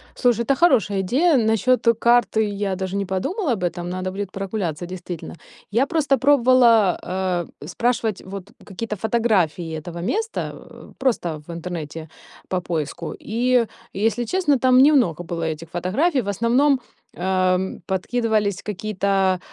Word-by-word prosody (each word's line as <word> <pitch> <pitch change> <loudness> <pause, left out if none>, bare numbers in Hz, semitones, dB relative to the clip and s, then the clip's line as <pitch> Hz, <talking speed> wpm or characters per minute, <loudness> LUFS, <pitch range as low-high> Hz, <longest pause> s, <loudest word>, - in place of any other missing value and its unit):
Слушай, 240 -3 +2
это 275 - +2
хорошая 225 - +3
идея. 275 - +3
Насчет 230 +3 +2
карты- 235 0 +3
я 205 -2 -1
даже 190 0 -4
не 200 - -1
подумала 275 - -1
об 195 -5 -4
этом. 175 0 -2
Надо 185 +1 -3
будет 195 0 -5
прогуляться, 190 -5 -3
действительно. 175 -2 -7 0.4
Я 235 +6 +3
просто 290 -4 +1
пробовала, 245 -7 +4
а, 180 -1 -1 0.2
спрашивать 230 -4 -1
вот 195 +1 -8
какие-то 210 +2 -5
фотографии 190 -7 0
этого 170 +2 -8
места, 445 - -2
э, - - -14
просто 175 - -1
в - - -7
интернете 165 -2 -6 0.4
по 185 -1 -1
поиску. 160 -4 -4
И, 240 +2 +1 0.3
если 225 +4 0
честно, 295 +1 +2
там 255 0 +4
немного 245 - +4
было 165 -1 -4
этих 160 0 -4
фотографий. 255 - +1
В 205 - -9
основном, 245 +7 +2 0.4
ам, 185 0 0
подкидывались 210 0 0
какие-то 195 -2 0
200 Hz, 140 wpm, -22 LUFS, 180-245 Hz, 0.4 s, пробовала